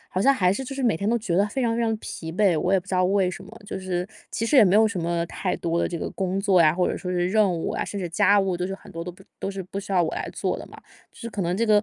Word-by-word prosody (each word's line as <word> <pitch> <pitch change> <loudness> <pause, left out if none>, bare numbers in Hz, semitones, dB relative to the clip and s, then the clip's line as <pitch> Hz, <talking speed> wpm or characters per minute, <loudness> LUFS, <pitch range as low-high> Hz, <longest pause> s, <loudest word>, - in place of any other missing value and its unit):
好 185 - -1
像 275 - +7
还 180 -6 +3
是 265 +7 -3
就 275 - -6
是 270 - -3
每 235 -9 +2
天 200 +5 -2
都 235 - +3
觉 180 -6 -2
得 200 +2 +4
非 265 - -3
常 230 -1 +1
非 235 - 0
常 225 -1 +1
疲 160 -5 -7
惫。 185 -3 +3
我 180 +4 0
也 195 - +4
不 180 - -23
知 200 - -8
道 185 0 +3
为 190 -1 +2
什 - - -9
么， - - -13 0.2
就 195 - -5
是 180 -1 -2 0.2
其 230 - -2
实 280 - +3
也 225 - +9
没 185 - +3
有 220 - +6
什 205 -4 -4
么 170 0 0
太 180 +2 -2
多 170 0 -1
的 - - +1
这 170 - -4
个 - - -3
工 190 0 -1
作 195 -3 +4
呀， 155 0 +4
或 180 0 +1
者 - - -2
说 180 - -5
是 180 0 0
任 210 -1 +3
务 165 -2 -2
啊， - - -2
甚 205 - -5
至 180 - -3
家 200 +5 +4
务 190 -2 0
都 180 - -2
是 195 - -4
很 195 - -14
多 165 0 -6
都 180 - -6
不 190 - -17 0.2
都 195 - -3
是 195 -1 -5
不 190 +2 -6
需 200 0 -6
要 180 - +4
我 160 - -2
来 - - -3
做 - - -2
的 - - -9
嘛。 - - -13 0.3
就 - - -19
是 230 - -5
可 200 -3 -3
能 175 +1 0
这 230 - +1
个 210 -1 +5
190 Hz, 380 characters per minute, -24 LUFS, 180-210 Hz, 0.3 s, 也